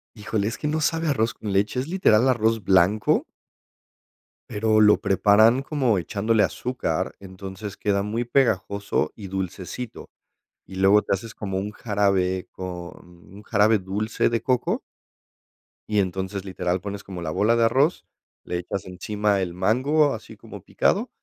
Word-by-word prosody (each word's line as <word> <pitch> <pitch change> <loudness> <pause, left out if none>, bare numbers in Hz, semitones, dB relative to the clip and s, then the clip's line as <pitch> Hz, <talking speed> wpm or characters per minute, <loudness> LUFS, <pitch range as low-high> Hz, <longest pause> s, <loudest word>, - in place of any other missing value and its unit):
Híjole, 105 -1 -2
es 115 - -3
que 150 - -3
no 155 +1 -1
sabe 165 +2 0
a - - +3
arroz 115 -4 0
con 105 -2 -5
leche, 100 +5 +1
es 130 - -3
literal 135 - +3
arroz 115 -3 +1
blanco 95 +3 +3 1.3
pero 110 +1 +2
lo 105 0 +6
preparan 110 +5 +4
como 135 -8 +1
echándole 110 +5 0
azúcar. 95 -10 -2
Entonces 95 +1 -8
queda 100 -1 0
muy 110 +4 -2
pegajoso 100 -5 0
y 100 -3 -8
dulcecito, 95 +5 -6 0.6
y - - -11
luego 95 +2 +5
te - - -1
haces 110 +3 -6
como 95 -3 -4
un 100 +2 -2
jarabe, 100 -4 0
con 95 - -6 0.6
un 100 +2 -12
jarabe 105 0 +3
dulce 100 +4 -1
de 115 -2 -1
coco 125 0 0 1.1
y 105 - +3
entonces 95 +1 -4
literal 90 -1 -2
pones 100 0 -6
como 90 -3 -7
la 80 - -3
bola 110 +7 +2
de 115 - +3
arroz, 135 +9 +2 0.4
le 90 - -3
echas 90 +2 -5
encima 100 +2 -1
el 90 -2 -3
mango, 135 +10 +2
así 110 - -9
como - - -11
picado, - - 0
105 Hz, 155 wpm, -24 LUFS, 95-115 Hz, 1.3 s, lo